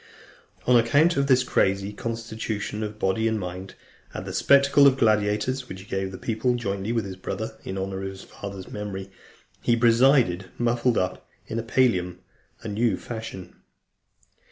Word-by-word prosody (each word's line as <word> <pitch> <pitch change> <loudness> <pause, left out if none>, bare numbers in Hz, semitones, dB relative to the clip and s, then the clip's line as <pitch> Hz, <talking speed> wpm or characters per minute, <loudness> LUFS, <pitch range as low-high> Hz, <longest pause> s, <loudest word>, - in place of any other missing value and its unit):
On 125 - +5
account 145 +9 +4
of 140 0 +1
this 130 -2 +4
crazy 100 -4 +1
constitution 110 -1 -4
of 105 0 -4
body 110 +3 +1
and 110 -1 0
mind, 90 +1 -7 0.4
at - - -5
the - - -6
spectacle 140 0 +5
of 135 -1 +4
gladiators, 110 +3 +1
which 95 0 -7
he - - -13
gave 95 -1 -3
the 95 - -7
people, 115 +4 0
jointly 100 -2 -3
with 115 -3 0
his 95 -1 -6
brother, 95 +3 -5
in 95 - -5
honour 95 0 -3
of 95 - -3
his 95 0 -10
father's 100 -2 -9
memory, 100 -2 -6 0.5
he 120 - +3
presided, 115 -5 +4
muffled 120 0 +1
up 90 0 -2 0.2
in 115 - -3
a - - -3
pallium 95 -8 +1 0.5
a - - -5
new 110 -1 +1
fashion. 110 -6 -8
110 Hz, 165 wpm, -25 LUFS, 95-120 Hz, 0.5 s, On